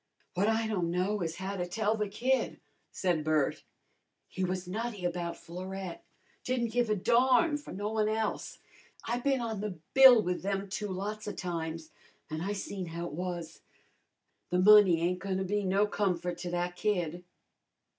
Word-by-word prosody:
"W'at 200 +4 +2
I 225 0 +1
don' 190 -6 -1
know 185 +4 0
is 165 -1 -2
how 190 +2 -4
to 180 -2 -2
tell 215 +3 0
the 210 -1 -1
kid," 255 +6 0 0.3
said 175 -5 0
Bert. 155 -2 +1 0.7
"He 190 - -4
was 185 0 -2
nutty 215 0 -4
about 175 -1 -2
Florette; 185 +1 -7 0.4
didn't 240 -2 -1
give 240 -1 +1
a 215 - +3
darn 250 - +4
for 295 - -11
no 205 +3 -3
one 215 -1 +1
else. 220 0 -2 0.5
I 240 +1 -1
bin 270 0 +1
on 220 -3 -3
the 205 -4 -4 0.2
bill 265 -3 +9
with 180 0 -2
them 195 +1 -2
two 210 +1 -3
lots 205 +3 -4
of 205 - -4
times, 165 -2 -4 0.4
an' 155 +1 -3
I 200 +4 -1
seen 195 -2 -5
how 170 +1 -5
it 175 - -6
was. 175 0 -5 0.9
The 180 - +1
money 190 -3 +7
ain't 180 +2 0
goin' 190 0 -2
to 190 - -1
be 205 +2 -1
no 195 +2 +3
comfort 180 -4 -1
to 180 - -4
that 175 0 -2
kid!" 180 -4 -1
195 Hz, 175 wpm, -30 LUFS, 175-215 Hz, 0.9 s, bill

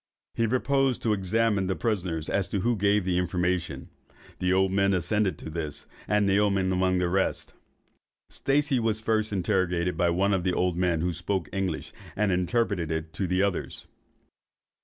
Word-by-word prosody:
He 115 - +1
proposed 135 +2 +1
to 110 - +2
examine 100 0 +1
the 95 - 0
prisoners 90 -9 -2
as 100 -3 0
to 100 - -1
who 120 +4 +1
gave 100 -1 +2
the 90 -1 +1
information. 90 -1 -2 0.5
The 90 0 +1
old 95 0 +3
men 100 0 +2
assented 100 +2 0
to 80 - -8
this, 75 -2 -5 0.2
and 105 -1 +2
Naoman 100 -1 +2
among 95 0 +2
the 90 -1 +1
rest. 95 +2 -1 0.8
Stacey 140 -1 +1
was 110 -2 0
first 110 -1 0
interrogated 90 -2 0
by 85 - +2
one 95 +4 +2
of 95 -2 0
the 90 -1 +1
old 90 -1 +1
men, 85 -2 +1
who 90 +1 0
spoke 85 0 -2
English, 95 -5 -3 0.2
and 105 -1 +1
interpreted 90 -5 -1
to 95 +2 -2
the 90 +2 +1
others. 100 -2 -3
95 Hz, 165 wpm, -27 LUFS, 90-105 Hz, 0.8 s, old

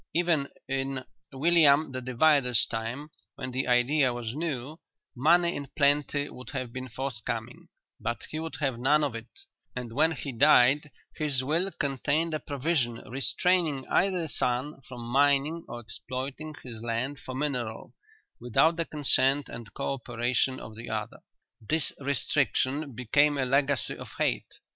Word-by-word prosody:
Even 165 -5 +2 0.2
in 135 -1 -2 0.3
William 150 0 +4
the 130 0 -4
Divider's 125 -1 +3
time, 120 +7 -5 0.2
when 130 - -5
the 130 +1 -1
idea 130 +2 +3
was 120 -2 -4
new, 150 -1 -4 0.4
money 170 +6 +4
in 140 -1 -5
plenty 145 0 +3
would 125 - -10
have 130 -4 -4
been 130 0 -5
forthcoming, 130 -3 -5 0.3
but 120 +1 -3
he 155 - -3
would 160 0 -5
have 135 -5 0
none 150 +5 +3
of 140 -5 -1
it, 115 0 -7 0.5
and 125 -2 -5
when 160 +5 +3
he 145 -2 -5
died 140 +2 +5 0.3
his 145 -4 0
will 165 +8 +1
contained 145 +4 0
a 155 - -1
provision 140 -4 -1
restraining 145 +2 +1
either 180 -3 +2
son 130 +1 -1
from 125 -2 -8
mining 140 +6 +2
or 120 - -7
exploiting 135 +6 -6
his 115 -4 -7
land 120 +4 -2
for 130 - -7
mineral 125 -6 -3 0.5
without 125 +8 +3
the 165 - 0
consent 140 -2 +2
and 115 -2 -8
co 140 0 -1
operation 125 +1 -1
of 110 - -10
the 115 +2 -8
other. 110 -1 -4 0.4
This 155 +7 0
restriction 140 0 0
became 145 +5 +3
a 135 - +1
legacy 135 -5 +1
of - - -8
hate. - - -1
135 Hz, 150 wpm, -28 LUFS, 125-150 Hz, 0.5 s, died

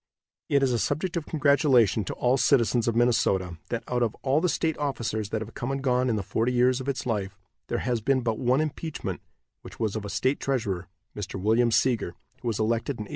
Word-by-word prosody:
It 140 -1 +3
is 130 -2 +2
a 120 - +1
subject 160 +8 -1
of 165 -3 -3
congratulation 140 - +3
to - - -4
all 125 +1 +2
citizens 120 -3 +3
of 115 - +1
Minnesota 95 -8 +2
that, 115 -1 -2
out 125 -1 -1
of 115 -2 0
all 140 +3 +2
the 180 - +2
state 160 -1 0
officers 115 -7 -2
that 110 0 -2
have 110 - -12
come 120 - -4
and 135 - -2
gone 130 -1 +1
in 115 - +1
the 105 - -2
forty 115 +6 0
years 125 +1 +3
of 135 - -4
its 135 -1 -3
life, 100 -4 -2 0.3
there - - -1
has 120 -3 0
been 130 +3 +2
but 115 -2 -1
one 130 +3 +2
impeachment, 155 +1 -4 0.4
which - - -12
was 110 -3 -1
of 110 - -3
a 100 - -5
state 130 +6 0
treasurer, 105 -9 -2 0.3
Mr. 100 -1 -5
William 115 +5 +3
Seeger, 115 -5 +1 0.3
who - - -5
was 110 -3 -1
elected 115 +5 0
in 110 - -5
1871. 105 - -13
120 Hz, 230 wpm, -26 LUFS, 110-135 Hz, 0.4 s, It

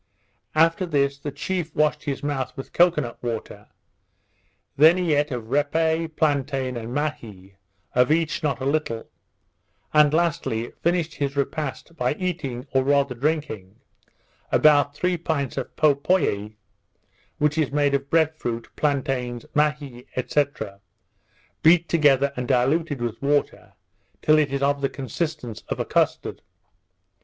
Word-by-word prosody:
After 165 +3 +3
this 140 -3 +1
the 145 - -5
chief 165 +3 -3
washed 150 0 +1
his 140 -2 -3
mouth 140 -3 -3
with 135 - -8
cocoa 175 -3 +4
nut 120 -3 -7
water; 115 -2 -5 1.1
then 160 +5 +6
he 175 -4 +1
eat 145 +1 +1
of 120 -4 -6
repe, 160 +3 +1
plantain, 135 -3 0
and 115 0 -5
mahee, 115 -10 -4 0.4
of 125 +3 +3
each 160 0 +1
not 140 -6 -1
a 130 - -4
little; 140 -6 -1 0.9
and, 150 -1 +6
lastly, 165 -8 0
finished 170 -2 0
his 140 -1 -3
repast 150 +2 -3
by 125 +2 0
eating, 150 -9 -3
or 130 -1 +3
rather 140 -1 +2
drinking, 130 -8 -2 0.8
about 145 -1 +4
three 180 +3 0
pints 155 -5 -2
of 135 - -5
popoie, 140 - +1 0.8
which 150 +1 +1
is 150 -4 +1
made 145 -1 +2
of 140 0 -1
bread 160 -1 +2
fruit, 115 -5 -4
plantains, 130 -4 -1
mahee, 150 -4 -1
&c. 145 +3 +2 1.2
beat 165 +1 +5
together 140 -4 +3
and 125 0 -4
diluted 135 +2 +1
with 115 -1 -4
water 145 +1 -1 0.5
till 155 0 +5
it 145 -3 +1
is 140 0 -1
of 140 0 +1
the 135 - +1
consistence 140 -3 -4
of - - -3
a - - -1
custard. - - 0
145 Hz, 140 wpm, -24 LUFS, 130-155 Hz, 1.2 s, then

